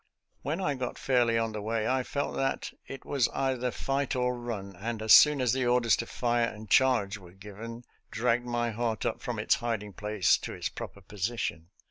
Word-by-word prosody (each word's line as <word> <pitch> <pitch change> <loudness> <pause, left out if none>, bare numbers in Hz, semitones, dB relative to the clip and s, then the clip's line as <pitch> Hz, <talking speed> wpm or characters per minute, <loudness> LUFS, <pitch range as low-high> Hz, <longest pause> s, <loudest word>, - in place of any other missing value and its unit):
When 150 +6 -2
I 150 -7 0
got 130 -2 -4
fairly 120 -3 +2
on 115 0 0
the 105 -1 -5
way 110 +1 -1
I 130 0 +2
felt 140 +2 -3
that 135 0 -1
it 135 - -8
was 135 -4 +2
either 130 -2 0
fight 135 +2 -2
or 125 0 +1
run, 110 -5 -6
and 110 +4 -4
as 110 0 +5
soon 150 -2 +8
as 125 -2 +2
the 130 -2 0
orders 120 -1 +4
to 120 - -4
fire 120 -1 +1
and 110 0 -8
charge 110 -4 +3
were 90 -2 -15
given, 105 +5 -9 0.3
dragged 120 +1 0
my 120 -1 0
heart 115 -1 -2
up - - -2
from - - -4
its - - +2
hiding 110 -4 -3
place 105 -2 +2
to - - -6
its - - -3
proper 100 - -8
position. 95 -4 -3
120 Hz, 200 wpm, -29 LUFS, 110-125 Hz, 0.3 s, soon